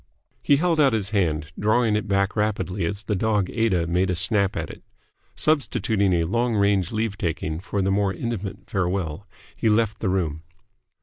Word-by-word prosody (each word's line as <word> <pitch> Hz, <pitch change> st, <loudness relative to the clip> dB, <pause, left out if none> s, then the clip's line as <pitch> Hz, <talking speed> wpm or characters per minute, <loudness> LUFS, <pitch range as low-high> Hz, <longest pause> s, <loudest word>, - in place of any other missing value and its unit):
He 145 Hz, -, +4 dB
held 165 Hz, +2 st, +1 dB
out 140 Hz, -5 st, +5 dB
his 105 Hz, -2 st, -1 dB
hand, 80 Hz, -6 st, 0 dB
drawing 110 Hz, +1 st, +2 dB
it 105 Hz, 0 st, -1 dB
back 100 Hz, 0 st, +1 dB
rapidly 105 Hz, -3 st, -1 dB
as 100 Hz, +5 st, -3 dB
the 105 Hz, -, -2 dB
dog 105 Hz, -1 st, 0 dB
Aida 105 Hz, -7 st, +1 dB
made 90 Hz, +2 st, +1 dB
a 90 Hz, -, +1 dB
snap 100 Hz, +3 st, +1 dB
at -, -, -3 dB
it. -, -, -13 dB, 0.5 s
Substituting 110 Hz, -9 st, +1 dB
a 85 Hz, -1 st, +2 dB
long 115 Hz, +7 st, 0 dB
range 100 Hz, -3 st, +2 dB
leave 110 Hz, -2 st, -2 dB
taking 80 Hz, -2 st, -2 dB
for 100 Hz, +1 st, -2 dB
the 95 Hz, -, +1 dB
more 100 Hz, 0 st, +2 dB
intimate 100 Hz, -4 st, -5 dB
farewell, 90 Hz, -1 st, -2 dB, 0.3 s
he 110 Hz, -, +1 dB
left 110 Hz, 0 st, +1 dB
the 100 Hz, -, -1 dB
room. 80 Hz, -5 st, -1 dB
100 Hz, 180 wpm, -24 LUFS, 90-110 Hz, 0.5 s, out